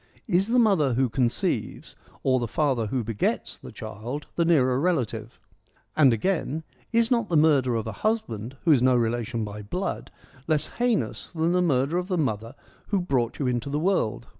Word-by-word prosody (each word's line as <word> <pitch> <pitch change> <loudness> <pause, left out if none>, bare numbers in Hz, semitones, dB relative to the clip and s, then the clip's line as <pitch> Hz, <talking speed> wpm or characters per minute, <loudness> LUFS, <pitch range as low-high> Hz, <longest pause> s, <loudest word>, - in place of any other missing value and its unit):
' - - -31
Is 185 +3 +2
the 240 +2 +2
mother 190 - +3
who 130 0 +2
conceives, 120 +1 -1 0.3
or 130 -1 +3
the 120 - -2
father 130 -4 0
who 125 +2 -1
begets 110 -2 -2
the 65 - -10
child, 125 - -6
the 170 - +2
nearer 130 -7 +3
relative? 120 -9 -1 0.3
' - - -39
And 140 -4 +6
again, 160 - -1
' 125 - -34
Is 230 +2 +2
not 235 -4 +1
the 170 - +2
murder 140 -6 +4
of 110 - -2
a 110 - -3
husband, 130 - -2
who 165 - +5
is 135 -5 +5
no 130 0 +4
relation 115 -1 -1
by 105 0 -7
blood, 180 - -4 0.4
less 155 -2 +2
heinous 240 -2 0
than 165 +1 +1
the 180 0 +2
murder 150 0 +1
of 180 - -4
the 185 -2 -1
mother 115 -4 -2 0.3
who 200 - +1
brought 130 -9 -1
you 140 - -2
into 125 +1 -1
the 145 - -1
world 165 - 0
135 Hz, 195 wpm, -26 LUFS, 120-175 Hz, 0.4 s, And